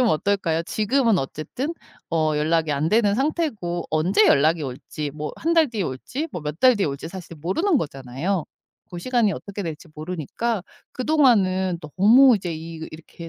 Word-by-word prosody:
좀 250 - +4
어떨까요? 170 -3 +1
지금은 225 +3 +1
어쨌든 205 - -4 0.3
어 155 -2 +1
연락이 160 +1 +1
안 145 +2 0
되는 210 0 +3
상태고 250 - -1
언제 180 +7 +3
연락이 155 +3 +3
올지 145 +2 -5
뭐 150 +1 -6
1 330 - +2
달 325 -3 +4
뒤에 225 -4 -3
올지 245 - -4
뭐 175 - -5
몇 150 +2 -5
달 255 -2 +6
뒤에 200 - +1
올지 140 +2 -5
사실 170 -2 -9
모르는 275 - +1
거잖아요. 145 - -3 0.5
그 175 - -6
시간이 235 -1 +1
어떻게 200 0 -6
될지 165 +1 -6
모르니까 180 - -3 0.3
그동안은 205 - +2 0.2
너무 235 +6 +7
이제 180 -4 -4
이 165 +1 -8
그 160 - -6
이렇게 165 +1 -10
180 Hz, 345 characters per minute, -23 LUFS, 155-230 Hz, 0.5 s, 너무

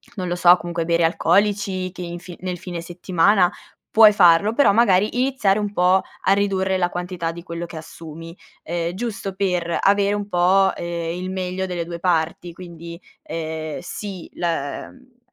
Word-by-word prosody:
non 185 -4 -4
lo 175 - -1
so, 175 0 +6
comunque 170 -1 -4
bere 170 0 +2
alcolici 190 +2 +1
che 180 - -10
in 175 0 -5
fi 175 0 -10
nel 180 -1 -4
fine 175 -1 -6
settimana 180 +2 +2 0.4
puoi 220 -1 +8
farlo, 175 +2 +5
però 285 0 +4
magari 210 +1 +3
iniziare 250 -7 +1
un 205 -1 -2
po' 180 0 +3 0.2
a - - +2
ridurre 190 -1 0
la 175 -1 +1
quantità 175 -1 -4
di 170 0 -10
quello 170 0 -6
che 170 - -9
assumi, 165 +1 -10 0.3
ehm, 170 0 -3
giusto 200 -3 -4
per 180 -3 -1
avere 200 0 +3
un 205 -1 -4
po', 190 +1 +3
ehm, 170 -1 -4
il 185 - -4
meglio 185 0 -3
delle 175 -2 -3
2 170 0 -7
parti. 170 0 -1
Quindi, 170 -1 -10 0.2
ehm, 160 -1 -5
sì 195 -5 -7
la, 165 -5 -3
mhmm, 255 -1 -21
180 Hz, 170 wpm, -21 LUFS, 170-195 Hz, 0.4 s, puoi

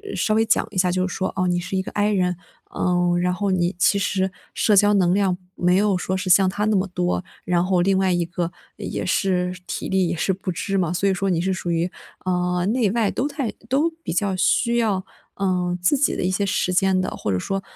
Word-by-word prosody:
稍 215 - +1
微 220 +1 +3
讲 225 - +2
一 200 - -7
下 180 0 +3
就 185 +1 0
是 185 - -6
说， 190 - -2
哦， 185 -1 0
你 175 0 +1
是 185 +2 -3
一 - - +1
个 - - -7
I 205 +1 +1
人， 180 -3 0 0.4
嗯， 175 -1 +1
然 180 +1 +1
后 200 +1 -1
你 175 -1 0
其 200 +2 +3
实 190 -1 0 0.2
社 210 - +3
交 205 +1 +5
能 180 -3 +3
量 190 -2 +1 0.2
没 180 0 +2
有 200 -1 +2
说 185 +1 -2
是 185 0 -3
像 190 +1 +5
他 205 +2 -3
那 215 0 +2
么 190 +1 0
多， 90 - -1 0.2
然 175 0 +2
后 185 -1 +2
另 190 +1 +2
外 190 -1 +2
一 175 -1 +1
个 170 0 -3 0.3
也 - - -4
是 180 -1 0
体 - - -4
力 190 -2 +2
也 170 - -2
是 170 - 0
不 185 0 -6
支 195 +3 -2
嘛。 175 -4 0
所 195 +3 0
以 - - +2
说 195 +1 -1
你 175 -3 +1
是 190 +2 0
属 185 -1 -4
于， 170 +1 0 0.3
呃， 180 -1 0
内 225 -1 +2
外 225 -2 +1
都 265 - -1
太 280 -5 -3 0.2
都 290 +6 +2
比 - - -4
较 195 +2 0
需 235 +6 +2
要， 205 -5 0 0.3
呃， 180 -2 0
自 180 +11 +3
己 275 - +1
的 - - -2
一 180 - +1
些 200 +2 0
时 185 -1 0
间 190 0 +3
的， 185 - -1
或 - - -4
者 95 - +1
说， 195 - -2
185 Hz, 265 characters per minute, -22 LUFS, 180-200 Hz, 0.4 s, 交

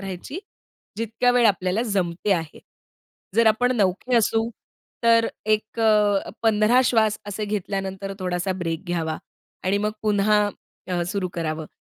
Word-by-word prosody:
राहायची 195 - -6 0.6
जितक्या 230 +3 +1
वेळ 245 -1 +4
आपल्याला 190 +1 +1
जमते 195 -3 0
आहे. 165 -4 -3 0.8
जर 230 0 +5
आपण 245 +3 +3
नवखे 200 +4 +1
असू 225 0 +2 0.5
तर 230 0 +5
अ, - - -2 0.2
एक 215 +2 0 0.6
15 220 +2 +4
श्वास 220 -3 +2
असे 205 +1 -3
घेतल्यानंतर 195 -1 -3
थोडासा 180 0 -1
ब्रेक 165 +1 -3
घ्यावा 165 -3 -2 0.5
आणि 195 +2 +2
मग 210 +1 -1
पुन्हा 210 0 +3 0.5
अ, 180 -1 0
सुरु 185 0 -2
करावं. 160 -2 -3
205 Hz, 130 wpm, -23 LUFS, 185-225 Hz, 0.8 s, जर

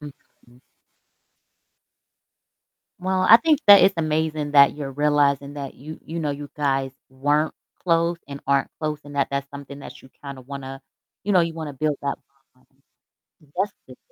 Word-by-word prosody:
Mhm. 130 -4 -16 2.4
Well, 185 +1 0
I 225 - +11
think 315 -1 +2
that 205 -1 +10
it's 195 +1 +4
amazing 155 -2 -1
that 140 -1 +6
you're 140 -2 -5
realizing 145 -1 +1
that 140 -2 -6
you 155 +4 -10
you 165 +1 -5
know, 150 -2 -1
you 145 0 -6
guys 135 -2 0 0.2
weren't 145 +4 0 0.3
close 170 -1 +1
and 140 0 -7
aren't 140 -1 +2
close, 155 -1 -3
and 145 0 -10
that 140 - +1
that's 140 0 -3
something 140 0 -10
that - - -11
you 130 - -17 0.2
kinda 140 -2 -7
wanna 135 0 -8 0.4
you 205 - 0
know, 180 - +5
you 165 -1 -1
wanna 160 -3 -6
build 150 +2 -1
that 140 - -2 0.4
bond. 130 - -30 0.9
That's 195 +2 0
good. - - -14
145 Hz, 160 wpm, -23 LUFS, 140-160 Hz, 2.4 s, I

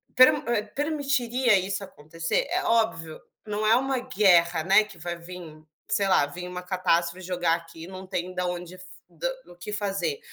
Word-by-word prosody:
per 255 0 +8
hã, 230 -3 -1
permitiria 265 -6 +1
isso 195 +1 -3
acontecer? 165 - -3
É 370 +1 0
óbvio, 220 - 0 0.3
não 215 0 -1
é 225 - +6
uma 265 0 +1
guerra, 180 -9 +3
né, 195 +5 +5
que 200 -4 -14
vai 170 +1 -5
vim, 170 -3 -10 0.3
sei 200 - +1
lá, 185 -6 +4
vim 180 +5 -7
uma 180 0 -6
catástrofe 180 -1 0
jogar 175 -2 +1
aqui, 165 -1 -10
não 190 0 -9
tem 185 -1 -3
da 180 0 -2
onde 180 0 -5
da - - -16
f - - -11 0.7
o 175 - -14
que 210 +4 -7
fazer. 195 -7 -2
185 Hz, 180 wpm, -26 LUFS, 170-220 Hz, 0.7 s, per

